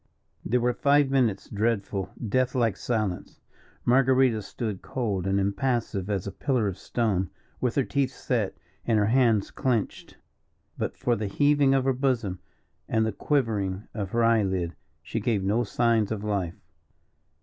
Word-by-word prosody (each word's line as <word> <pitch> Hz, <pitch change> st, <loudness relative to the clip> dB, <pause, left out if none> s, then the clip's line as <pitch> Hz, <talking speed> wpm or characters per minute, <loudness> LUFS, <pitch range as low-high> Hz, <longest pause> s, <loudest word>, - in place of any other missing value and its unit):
There 125 Hz, +3 st, +1 dB
were 120 Hz, +1 st, +1 dB
five 140 Hz, +1 st, +3 dB
minutes' 120 Hz, -7 st, +1 dB
dreadful, 100 Hz, -2 st, -1 dB, 0.2 s
death 130 Hz, +5 st, +1 dB
like 115 Hz, -6 st, +2 dB
silence. 105 Hz, -7 st, -3 dB, 0.5 s
Marguerita 130 Hz, -2 st, +4 dB
stood 105 Hz, -1 st, -5 dB
cold 105 Hz, -8 st, -2 dB
and 95 Hz, +1 st, +2 dB
impassive 100 Hz, -1 st, -1 dB
as 100 Hz, -3 st, -1 dB
a 100 Hz, -, -4 dB
pillar 125 Hz, -4 st, 0 dB
of 95 Hz, -1 st, -4 dB
stone, 100 Hz, -7 st, 0 dB, 0.3 s
with 125 Hz, -2 st, 0 dB
her 140 Hz, -, +3 dB
teeth 140 Hz, 0 st, 0 dB
set 115 Hz, -8 st, -2 dB, 0.3 s
and 115 Hz, -2 st, +2 dB
her 105 Hz, -, +3 dB
hands 115 Hz, -3 st, +3 dB
clenched. 120 Hz, -5 st, -2 dB, 0.6 s
But -, -, -3 dB
for 120 Hz, -, +1 dB
the 105 Hz, -1 st, -3 dB
heaving 145 Hz, +4 st, +3 dB
of 135 Hz, -, +2 dB
her 135 Hz, 0 st, +2 dB
bosom 125 Hz, -8 st, -1 dB, 0.5 s
and 110 Hz, 0 st, +2 dB
the 110 Hz, -, 0 dB
quivering 105 Hz, -7 st, -1 dB
of 100 Hz, -4 st, -3 dB
her 115 Hz, +4 st, +1 dB
eyelid, 95 Hz, -7 st, +1 dB, 0.3 s
she 100 Hz, +8 st, -3 dB
gave 105 Hz, -3 st, 0 dB
no 105 Hz, +5 st, +2 dB
signs 115 Hz, -1 st, +1 dB
of 105 Hz, -2 st, -3 dB
life. 100 Hz, -5 st, -1 dB
115 Hz, 155 wpm, -26 LUFS, 100-125 Hz, 0.6 s, Marguerita